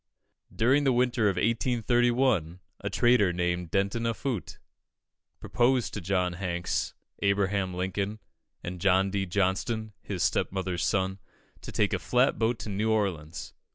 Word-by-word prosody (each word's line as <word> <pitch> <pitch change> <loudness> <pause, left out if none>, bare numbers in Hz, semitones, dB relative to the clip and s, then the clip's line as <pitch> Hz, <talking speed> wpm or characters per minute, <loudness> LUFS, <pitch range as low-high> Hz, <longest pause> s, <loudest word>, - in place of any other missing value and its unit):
During 130 +6 +3
the 135 - +3
winter 120 -3 +2
of 95 - -1
1831, 120 -4 +1 0.2
a - - -3
trader, 120 -6 +4
named 90 -1 -1
Denton 100 +6 0
Offutt, 115 -2 -3 0.8
proposed 125 0 +1
to 105 - -4
John 90 0 0
Hanks, 90 -1 -2 0.3
Abraham 100 -2 +1
Lincoln, 95 +3 -2 0.5
and 90 0 -6
John 95 0 +3
D. 95 -1 -1
Johnston, 100 +4 -1
his 95 -5 -3
stepmother's 95 -3 -1
son, 95 -1 0 0.4
to - - -8
take 105 0 +1
a 90 - 0
flat 125 - +2
boat 115 +1 +1
to - - -6
New 105 +3 -1
Orleans. 90 -8 -2
100 Hz, 135 wpm, -28 LUFS, 90-115 Hz, 0.8 s, trader